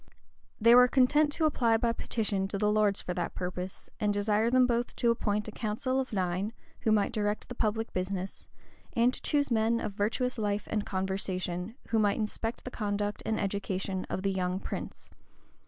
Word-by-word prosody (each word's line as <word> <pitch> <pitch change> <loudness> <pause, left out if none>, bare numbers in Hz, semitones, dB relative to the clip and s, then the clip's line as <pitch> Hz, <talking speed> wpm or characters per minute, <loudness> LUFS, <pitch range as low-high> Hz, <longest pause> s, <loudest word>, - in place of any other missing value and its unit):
They 230 +1 +7
were 250 0 +8
content 290 +4 +4
to 320 - +1
apply 235 -7 +3
by 230 0 +1
petition 200 -5 -1
to 200 - -3
the 210 +1 +2
lords 210 -2 +2
for 180 - -3
that 175 -1 -3
purpose, 180 +1 -5
and 210 -2 +2
desire 210 +2 +2
them 255 +1 +5
both 240 -1 -1
to 235 - +3
appoint 210 -2 -1
a - - -5
council 235 +5 -1
of 260 - -3
nine, 190 +1 -1 0.3
who 220 - +1
might 210 -2 +3
direct 210 0 -2
the - - -4
public 225 -1 -1
business, 185 +1 -4 0.4
and 240 +2 +3
to - - -6
choose 285 -3 +1
men 230 +1 +2
of - - -3
virtuous 230 +5 -1
life 205 -1 -1
and 210 -2 -1
conversation, 190 0 -2
who 225 - +2
might 205 -2 +2
inspect 225 +1 -3
the 250 - -5
conduct 205 -2 -2
and 220 - 0
education 195 -1 -2
of 185 - -3
the 195 - +1
young 185 -1 -1
prince. - - -6
210 Hz, 190 wpm, -30 LUFS, 195-235 Hz, 0.4 s, were